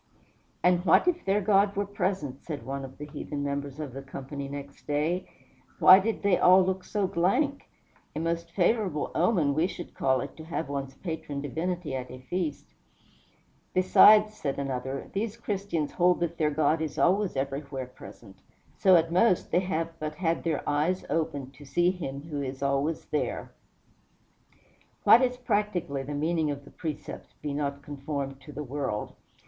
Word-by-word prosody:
"And 180 0 +4
what 180 - +5
if 350 -1 +1
their 200 +2 +2
God 200 0 +3
were 200 +1 0
present?" 185 -9 -3
said 150 -4 -6
one 135 +1 -4
of 135 0 -9
the 150 - -6
heathen 145 0 -5
members 140 0 -3
of 145 -5 -5
the 135 - -6
company, 140 +1 -7
next 140 0 -9
day. 155 +5 0 0.5
"Why 185 +1 +9
did 220 +3 -2
they 200 -3 +3
all 185 +1 +7
look 190 0 -1
so 205 +1 -1
blank? 250 - 0 0.5
A - - -2
most 170 +1 -2
favorable 185 -3 +1
omen, 170 -5 +2
we 160 +5 +2
should 175 - -8
call 130 -1 +1
it, - - -7
to 160 - -9
have 165 -2 -3
one's 135 -1 -4
patron 160 -5 -5
divinity 160 +3 -3
at 125 -1 -5
a 130 - -8
feast." 150 +3 -4 1.0
"Besides," 210 +3 +7
said 140 -9 -3
another, 135 -1 -3
"these 215 +2 -2
Christians 195 -9 -2
hold 180 0 +3
that 170 -1 -2
their 155 -1 +3
God 155 +1 +1
is 155 -2 -3
always 195 0 +2
everywhere 135 0 -3
present; 115 -5 -13 0.4
so, 190 -2 +5
at 165 -1 +3
most, 185 +1 +3
they - - +4
have 165 -3 -2
but 155 0 -4
had 165 0 -1
their 160 -3 -1
eyes 155 +6 +1
opened 145 -4 -2
to 145 - -14
see 175 +5 +2
Him 140 -6 -6
who 150 -3 -4
is 135 0 -5
always 140 +3 0
there!" 150 - -2 1.5
What 235 - +8
is 250 -1 +1
practically 205 - -1
the 145 +2 -5
meaning 160 +1 0
of 140 -1 -5
the - - -14
precept, 155 -3 -7
"Be 145 -1 -2
not 140 -1 -3
conformed 140 -1 -5
to 145 - -11
the 150 +1 -5
world"? 135 -6 -3
155 Hz, 175 wpm, -28 LUFS, 140-185 Hz, 1.5 s, Why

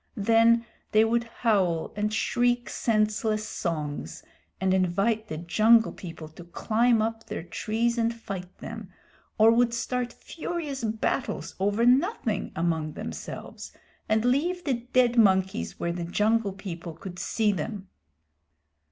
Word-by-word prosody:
Then 230 +2 +4 0.3
they 215 +1 +6
would 235 +1 +1
howl 195 -8 0
and 210 +1 -1
shriek 240 +2 +1
senseless 215 -1 0
songs, 150 - -4 0.4
and 190 0 +2
invite 195 +5 +1
the 155 - -5
Jungle 220 +7 +4
People 165 -3 -9
to 160 +3 -12
climb 225 +6 +2
up 225 0 -4
their - - -5
trees 230 +6 -1
and 230 0 +2
fight 195 -6 -7
them, - - -8 0.5
or 220 +1 +7
would 235 0 +3
start 245 0 -2
furious 305 -3 -5
battles 225 +4 -2
over 205 +4 +2
nothing 255 - +2
among 160 -2 -1
themselves, - - -7 0.4
and 220 +1 +2
leave 340 +9 +1
the 275 - +1 0.2
dead 245 -2 +3
monkeys 190 - +2
where 170 - -1
the 175 -1 -4
Jungle 210 +3 +1
People 175 -4 -7
could 180 +2 -9
see 220 -2 +1
them. 195 +2 -4
215 Hz, 135 wpm, -27 LUFS, 185-235 Hz, 0.5 s, or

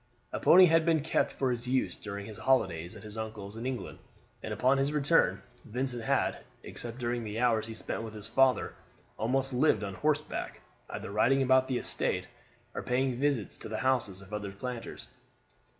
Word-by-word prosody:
A - - -1
pony 185 +1 +8
had 165 -1 +4
been 160 -2 +3
kept 160 - +1
for 130 -2 0
his 120 0 -2
use 130 +1 +1
during 100 -1 -6
his 110 -1 -9
holidays 90 -9 +1
at 105 - -11
his 105 +1 -6
uncle's 110 -2 -6
in 115 +3 -4
England, 130 -2 -5 0.4
and - - -5
upon 130 +2 +3
his 135 +2 +1
return 145 -2 +2 0.2
Vincent 125 +1 -3
had, 110 - +1 0.2
except 120 0 -5
during 120 -1 -2
the 105 0 -5
hours 115 -3 +2
he 115 - -7
spent 110 - -4
with 110 -1 -7
his 105 0 -5
father, 130 +2 +3 0.5
almost 135 +4 0
lived 125 -5 +3
on 100 -2 -4
horseback, 150 +6 -1 0.3
either - - -6
riding 125 +6 +3
about 130 0 +4
the 130 - 0
estate, - - 0 0.5
or - - -3
paying 125 0 0
visits 140 -7 0
to - - -8
the 110 - -3
houses 110 -8 0
of 100 +2 -14
other 105 -2 -3
planters. 120 +4 -6
120 Hz, 185 wpm, -30 LUFS, 110-135 Hz, 0.5 s, pony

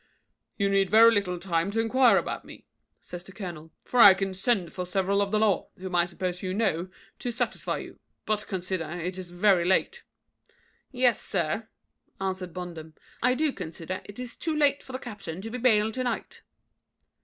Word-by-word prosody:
"You 200 - +2
need 195 -1 +2
very 225 +3 +7
little 190 -4 0
time 170 0 -1
to 220 +3 -1
enquire 240 +2 +5
after - - -5
me," - - -12 0.4
says 175 0 -8
the 195 - -13
colonel, 170 -6 -8
"for 250 - -1
I 200 -4 +10
can 195 0 -2
send 190 -3 0
for 180 - -3
several 195 +2 +1
of 200 - 0
the 215 - +1
law, 210 -3 +2
whom 185 0 -7
I 175 -1 +4
suppose 180 0 -4
you 185 -1 -3
know, 185 -5 0 0.3
to 245 - -3
satisfy 240 0 -2
you; - - -9 0.3
but 215 -1 -1
consider, 185 -4 -3
it 180 +2 -4
is 180 -2 -7
very 180 0 +3
late." 190 - +1 0.9
"Yes, 250 -3 +2
sir," 195 +5 -2 0.5
answered 185 -2 -3
Bondum, 165 -3 -8 0.3
"I 250 +1 +3
do 300 0 +1
consider 175 0 -6
it 205 - -11
is 250 -1 -7
too 320 -2 -2
late 285 -2 +3
for 260 - -12
the 255 - -3
captain 200 -9 -7
to 225 +2 -7
be 250 - -4
bailed 220 -3 +3
to 255 - -2
night." 245 - -4
195 Hz, 190 wpm, -27 LUFS, 180-230 Hz, 0.9 s, I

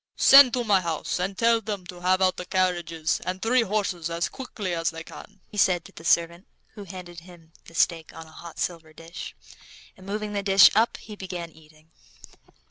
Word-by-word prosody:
"Send 275 -2 +8
to 245 - 0
my 205 -4 +3
house, 165 0 -3
and 190 +2 -3
tell 230 0 +3
them 205 -3 -5
to 175 0 -10
have 185 +1 +2
out 185 -1 +2
the 180 - -6
carriage 180 -2 0
and 165 +3 -2
three 235 +5 +2
horses 195 -6 -2
as 170 +1 -2
quick 260 -3 -11
as 175 -4 -1
they 165 0 -8
can," 205 +3 -13
he 210 - -12
said 180 -3 +2
to - - -13
the 165 - -13
servant, 170 +2 +1 0.2
who 205 -2 -11
handed 175 -2 -10
him 165 -2 -17
the 165 - -15
steak 165 -1 +1
on 165 - -11
a 160 - -17
hot 165 0 -12
silver 165 -3 -4
dish, 165 +2 -9 0.6
and 190 - -15
moving 210 +1 -4
the 200 - -1
dish 195 -1 +7
up 225 +2 +2
he 210 - -11
began 180 -4 -7
eating. 155 0 -21
180 Hz, 205 wpm, -25 LUFS, 165-200 Hz, 0.6 s, Send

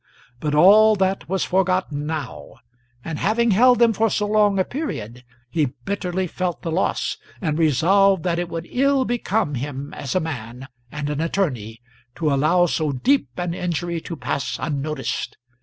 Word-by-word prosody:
But 150 +1 -1
all 210 +7 +7
that 190 -2 -1
was 190 -1 0
forgotten 185 -6 0
now; 155 -5 -5 0.5
and 160 -2 -4
having 230 +3 +2
held 245 +5 +5
them 235 -1 +4
for 225 +2 +1
so 210 - 0
long 205 -1 +3
a 190 - +3
period, 125 - -5 0.2
he 140 0 -1
bitterly 190 -2 -2
felt 180 0 -3
the 165 - -3
loss, 180 +4 -1 0.2
and 155 -4 -1
resolved 185 +5 +3
that 175 -2 0
it 175 -1 -3
would 165 0 -5
ill 275 0 +2
become 225 -8 -1
him 140 +2 -5
as 140 +2 -5
a - - +4
man 130 -5 -6 0.2
and 145 -1 -4
an 150 +1 -2
attorney 125 - -2 0.3
to 155 -4 0
allow 155 +6 +3
so 155 -3 0
deep 140 - +1
an 175 -1 -2
injury 175 -1 -3
to 170 - -6
pass 130 -4 -3
unnoticed. 145 -3 -3
170 Hz, 165 wpm, -22 LUFS, 145-195 Hz, 0.5 s, all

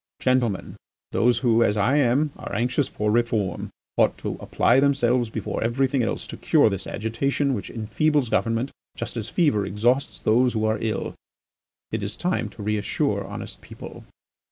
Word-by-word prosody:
Gentlemen, 125 -6 0 0.3
those 120 0 +3
who, 115 -1 +5
as 105 -1 +1
I 120 +8 +3
am, 140 +2 +3
are - - -6
anxious 125 +5 +1
for 105 0 -1
reform, 110 -6 0 0.3
ought - - +3
to - - -4
apply 130 - +3
themselves 125 -4 +2
before - - -3
everything 130 +3 +1
else 115 - -2
to - - -8
cure 110 - +4
this 100 -1 -3
agitation 135 +6 -1
which 105 - -4
enfeebles 130 +5 0
government 115 +4 0 0.3
just - - -5
as 115 -1 -3
fever 145 - +2
exhausts 120 +8 0
those 120 +3 +3
who 110 -1 0
are 110 0 +1
ill. 110 -2 -2 0.8
It 110 - -2
is 100 +2 -3
time 175 - -1
to 105 - -10
reassure 105 0 0
honest - - -7
people." - - -10
115 Hz, 160 wpm, -24 LUFS, 110-130 Hz, 0.8 s, who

